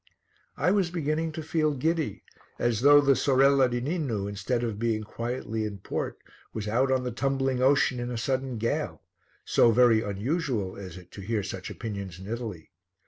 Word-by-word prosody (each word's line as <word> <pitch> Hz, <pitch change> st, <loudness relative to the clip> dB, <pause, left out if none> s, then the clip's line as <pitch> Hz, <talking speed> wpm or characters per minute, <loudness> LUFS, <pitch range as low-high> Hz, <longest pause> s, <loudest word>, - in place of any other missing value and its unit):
I 165 Hz, +6 st, +2 dB
was 195 Hz, -3 st, +2 dB
beginning 160 Hz, -1 st, -1 dB
to 160 Hz, 0 st, -5 dB
feel 155 Hz, -1 st, +1 dB
giddy, 145 Hz, -, -1 dB, 0.3 s
as 120 Hz, -2 st, 0 dB
though 145 Hz, +2 st, +8 dB
the 140 Hz, -1 st, +4 dB
Sorella 135 Hz, -1 st, +4 dB
di 120 Hz, 0 st, -1 dB
Ninu, 130 Hz, -, -2 dB
instead 100 Hz, +5 st, -2 dB
of 110 Hz, -3 st, -3 dB
being 110 Hz, -2 st, 0 dB
quietly 115 Hz, 0 st, -4 dB
in 105 Hz, -2 st, -4 dB
port, 95 Hz, -, -4 dB, 0.4 s
was 110 Hz, -1 st, -4 dB
out 130 Hz, +5 st, +2 dB
on 130 Hz, -1 st, +2 dB
the 125 Hz, -, -2 dB
tumbling 135 Hz, +1 st, 0 dB
ocean 130 Hz, -1 st, +3 dB
in 120 Hz, 0 st, -3 dB
a 120 Hz, -, -3 dB
sudden 130 Hz, +1 st, -1 dB
gale, 115 Hz, +2 st, -2 dB, 0.4 s
so 120 Hz, -, +5 dB
very 115 Hz, -1 st, +5 dB
unusual 110 Hz, -, -2 dB
is 95 Hz, -3 st, -8 dB
it 90 Hz, -, -14 dB
to 100 Hz, -, -9 dB
hear 105 Hz, +1 st, -1 dB
such 95 Hz, -1 st, -6 dB
opinions 100 Hz, -6 st, -6 dB
in 95 Hz, -, -10 dB
Italy. 110 Hz, -6 st, -6 dB
120 Hz, 180 wpm, -27 LUFS, 105-140 Hz, 0.4 s, though